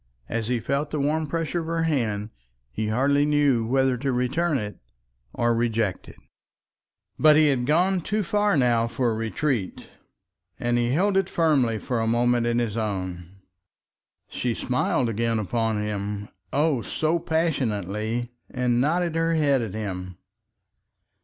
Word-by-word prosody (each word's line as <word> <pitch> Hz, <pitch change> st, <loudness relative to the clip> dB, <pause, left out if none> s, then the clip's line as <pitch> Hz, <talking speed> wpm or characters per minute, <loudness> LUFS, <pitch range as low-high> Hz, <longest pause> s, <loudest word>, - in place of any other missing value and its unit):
As 115 Hz, -1 st, -2 dB
he 125 Hz, -1 st, 0 dB
felt 140 Hz, +5 st, -1 dB
the 150 Hz, -, -3 dB
warm 155 Hz, +2 st, 0 dB
pressure 165 Hz, +2 st, -2 dB
of 160 Hz, -, -5 dB
her 165 Hz, 0 st, 0 dB
hand 110 Hz, -9 st, -1 dB, 0.4 s
he 110 Hz, -, -3 dB
hardly 140 Hz, +6 st, +2 dB
knew 145 Hz, -6 st, +2 dB
whether 130 Hz, 0 st, +2 dB
to 135 Hz, +2 st, -1 dB
return 135 Hz, +6 st, 0 dB
it 105 Hz, -3 st, -5 dB, 0.5 s
or 120 Hz, -, 0 dB
to -, -, +3 dB
reject 115 Hz, -4 st, -1 dB
it. -, -, -13 dB, 1.0 s
But 155 Hz, -1 st, +7 dB
he 155 Hz, -1 st, +5 dB
had 125 Hz, -3 st, 0 dB
gone 180 Hz, +5 st, +2 dB
too 210 Hz, +5 st, -1 dB
far 205 Hz, 0 st, +1 dB
now 120 Hz, -3 st, +3 dB
for 115 Hz, 0 st, 0 dB
retreat, 115 Hz, -1 st, -2 dB, 0.7 s
and 120 Hz, 0 st, +1 dB
he 120 Hz, 0 st, +1 dB
held 190 Hz, +9 st, +2 dB
it 195 Hz, -2 st, +1 dB
firmly 140 Hz, -9 st, +2 dB
for 120 Hz, +2 st, -2 dB
a 115 Hz, -, 0 dB
moment 120 Hz, +1 st, +2 dB
in 120 Hz, 0 st, +1 dB
his 115 Hz, -2 st, -1 dB
own. 95 Hz, -5 st, -3 dB, 1.0 s
She 120 Hz, -2 st, -2 dB
smiled 125 Hz, -1 st, 0 dB
again 115 Hz, +1 st, 0 dB
upon 110 Hz, +1 st, -1 dB
him, 105 Hz, -1 st, -4 dB, 0.2 s
oh! 145 Hz, -3 st, +1 dB
so 160 Hz, +8 st, 0 dB
passionately, 120 Hz, -, -1 dB, 0.2 s
and 125 Hz, -1 st, +1 dB
nodded 170 Hz, +4 st, +1 dB
her 165 Hz, 0 st, +1 dB
head 140 Hz, -4 st, +3 dB
at 110 Hz, -3 st, -5 dB
him. 95 Hz, -4 st, -5 dB
125 Hz, 155 wpm, -25 LUFS, 115-150 Hz, 1.0 s, But